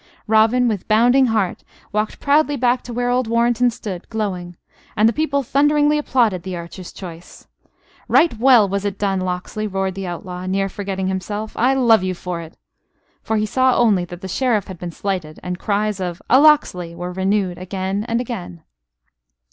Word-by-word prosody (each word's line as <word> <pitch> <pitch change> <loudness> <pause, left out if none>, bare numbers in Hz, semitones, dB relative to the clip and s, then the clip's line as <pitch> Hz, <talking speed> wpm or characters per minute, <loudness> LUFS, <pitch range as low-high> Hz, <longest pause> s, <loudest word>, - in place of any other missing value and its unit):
Robin, 225 +3 +3
with 210 -5 -2
bounding 245 +5 +4
heart, 215 -5 -1 0.3
walked 210 +1 -2
proudly 290 +1 +2
back 245 0 +2
to 245 - -9
where 245 +1 -1
old 250 -1 +1
Warrenton 235 +1 +2
stood, 200 -6 -7
glowing; 185 -6 -4 0.4
and 215 +2 +5
the 230 - +2
people 280 -1 0
thunderingly 295 +3 +3
applauded 235 -10 +1
the 185 0 -5
archer's 170 +1 -9
choice. 175 -2 -11 0.6
"Right 330 -7 +4
well 240 -4 +6
was 200 +1 -2
it 200 -1 -3
done, 195 -2 0
Locksley!" 185 +4 -3
roared 195 -1 -2
the 195 0 -5
outlaw, 180 +1 -6
near 195 +1 0
forgetting 195 -1 -4
himself. 205 +3 -4
"I 260 +3 +2
love 235 -6 +4
you 185 0 -2
for 175 -1 -5
it." 165 0 -12 0.6
For 220 - -1
he 215 - +1
saw 255 +3 +2
only 210 -7 +3
that 175 0 -10
the 190 - -6
Sheriff 220 0 0
had 185 -3 -9
been 175 - -5
slighted, 180 -3 -4
and 180 0 -4
cries 210 -1 -1
of: 180 -1 -4
"A 260 +3 +7
Locksley!" 180 - +3
were 175 +1 -5
renewed 190 -1 0
again 190 +2 -3
and 230 +1 0
again. 90 - -6
205 Hz, 180 wpm, -20 LUFS, 185-240 Hz, 0.6 s, A